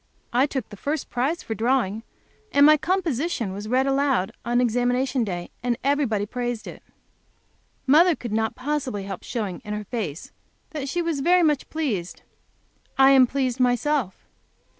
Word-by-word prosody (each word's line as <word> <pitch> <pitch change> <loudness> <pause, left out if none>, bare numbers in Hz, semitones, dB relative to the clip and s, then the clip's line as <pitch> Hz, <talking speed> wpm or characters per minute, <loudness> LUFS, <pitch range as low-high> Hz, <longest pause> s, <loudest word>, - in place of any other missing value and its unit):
I 255 +4 +3
took 265 -5 -4
the 205 - -11
first 295 +8 -3
prize 275 +8 -1
for 225 - -4
drawing, 225 -2 0 0.5
and 285 0 +6
my 305 +1 +8
composition 310 - -1
was 205 +2 -6
read 255 +3 +2
aloud 270 -8 +1
on 240 +1 +1
examination 245 +2 +1
day, 175 -4 -5
and 240 -1 -1
everybody 265 -7 +1
praised 240 0 -4
it. - - -9 1.0
Mother 320 +5 +5
could 240 -5 -7
not 220 +1 0
possibly 260 -6 -3
help 195 -2 -6
showing, 210 -7 -4
in 210 -1 -4
her 210 - -4
face, 195 - -5 0.4
that 280 -3 -4
she 350 +4 -1
was 330 -4 -1
very 355 +5 +4
much 300 -4 +1
pleased. 230 - -3 0.7
I 270 0 +7
am 260 -2 +6
pleased 260 -1 -1
myself. 250 -3 0
255 Hz, 160 wpm, -24 LUFS, 220-285 Hz, 1.0 s, my